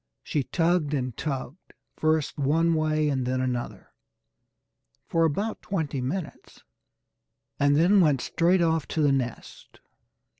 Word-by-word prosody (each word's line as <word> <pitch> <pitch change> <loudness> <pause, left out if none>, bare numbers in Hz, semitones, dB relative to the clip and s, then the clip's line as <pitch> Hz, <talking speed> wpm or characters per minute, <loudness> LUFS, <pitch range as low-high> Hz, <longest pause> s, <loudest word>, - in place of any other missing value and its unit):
She 150 - -1
tugged 165 -3 +1
and 125 -4 -3
tugged, 140 +2 -6 0.2
first 155 -1 0
one 165 +4 +2
way 155 -1 +1
and 135 -3 0
then 130 +1 -1
another 125 -2 -4 1.1
for 165 0 +1
about 200 +9 -2
twenty 155 -8 -3
minutes, 150 +6 -6 1.0
and 145 0 +3
then 185 +6 +5
went 150 -6 +3
straight 175 +1 +2
off 160 -2 0
to 160 - -2
the 145 - +4
nest. 125 -3 -4
155 Hz, 125 wpm, -26 LUFS, 135-165 Hz, 1.1 s, then